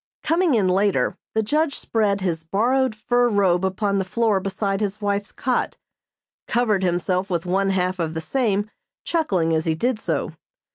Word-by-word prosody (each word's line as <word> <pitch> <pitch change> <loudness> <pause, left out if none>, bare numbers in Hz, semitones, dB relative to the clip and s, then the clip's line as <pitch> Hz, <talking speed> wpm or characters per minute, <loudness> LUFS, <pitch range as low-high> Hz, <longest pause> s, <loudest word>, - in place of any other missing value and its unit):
Coming 330 -3 +2
in 200 -4 +2
later, 195 +2 +2 0.2
the 220 - +2
judge 300 +6 0
spread 205 -3 0
his 170 -4 -1
borrowed 240 +8 +1
fur 245 +2 +2
robe 190 -4 +2
upon 200 +1 0
the - - +1
floor 210 +1 +1
beside 195 +1 -2
his 205 0 -2
wife's 205 -1 -2
cot, 255 -1 -1 0.7
covered 225 -5 +1
himself 180 +1 0
with 170 -2 -1
one 195 +2 +1
half 185 -1 0
of 160 -1 -2
the - - -1
same, 210 0 0 0.3
chuckling 190 - +1
as 160 0 0
he 160 -1 +1
did 240 +6 0
so. - - -2
200 Hz, 170 wpm, -22 LUFS, 185-230 Hz, 0.7 s, Coming